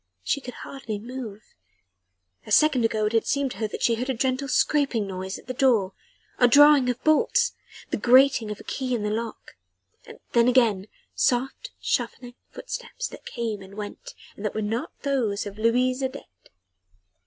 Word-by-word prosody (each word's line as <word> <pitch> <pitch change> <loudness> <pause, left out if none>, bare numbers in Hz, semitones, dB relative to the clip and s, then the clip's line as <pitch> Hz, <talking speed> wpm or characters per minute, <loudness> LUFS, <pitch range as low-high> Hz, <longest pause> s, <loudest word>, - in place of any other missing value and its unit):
She 280 - 0
could 250 -1 -8
hardly 250 -6 -6
move. 225 -2 -8 0.9
A - - -9
second 295 -6 +4
or - - +5
two 225 - -4
ago 215 - +1
it 210 - 0
had 225 - +1
seemed 280 -2 0
to - - -8
her 220 - -1
that - - -6
she 235 - +4
heard 250 +3 -3
a 265 - 0
gentle 260 +3 -1
scraping 275 -5 +1
noise 190 0 -5
at - - -15
the 255 - -4
door 235 -7 +2 0.5
a 245 - +6
drawing 285 0 +6
of 245 0 -3
bolts 470 +10 +3 0.4
the - - 0
grating 255 -2 +5
of 210 - -5
a - - -11
key 255 -2 -2
in 220 - -3
the 210 - -1
lock 225 - -5 0.7
then 235 0 +4
again, 225 -6 +3 0.3
soft, 265 - 0
shuffling 245 -1 -2 0.2
footsteps - - -6
that - - -12
came 225 -4 -4
and 195 +1 -12
went 215 - -8 0.2
and 200 - -10
that 210 - -2
were 215 - -1
not 225 +4 -2
those 240 -9 0
of 205 +1 -8
Louise 250 +3 +2
Adet. 260 - -7
245 Hz, 185 wpm, -25 LUFS, 215-265 Hz, 0.9 s, a